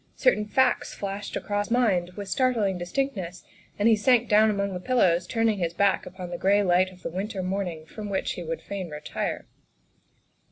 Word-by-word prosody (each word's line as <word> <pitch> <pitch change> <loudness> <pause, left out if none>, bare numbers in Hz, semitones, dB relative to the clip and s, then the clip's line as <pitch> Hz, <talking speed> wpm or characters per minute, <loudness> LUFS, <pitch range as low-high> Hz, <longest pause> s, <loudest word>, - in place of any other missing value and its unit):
Certain 210 - +2
facts 260 +4 +1
flashed 200 0 -5
across 205 -1 -2
his - - -13
mind 185 -8 +2
with 205 -1 -6
startling 235 -7 +1
distinctness, 185 -2 -3 0.3
and 205 - +2
he 225 - +6
sank 240 +2 +3
down 215 +1 +5
among 200 -2 -1
the 180 - -4
pillows, 180 -6 +2
turning 225 -3 +1
his 170 -1 -2
back 200 0 +2
upon 180 -1 -8
the 175 - -5
gray 200 +2 +3
light 185 0 +3
of 185 -1 -17
the - - -3
winter 190 +2 -3
morning 180 -4 -3
from 210 +5 -7
which 190 -1 -1
he - - -5
would 165 -1 -5
fain 195 -3 -5
retire. 150 0 -4
200 Hz, 190 wpm, -26 LUFS, 180-215 Hz, 0.3 s, he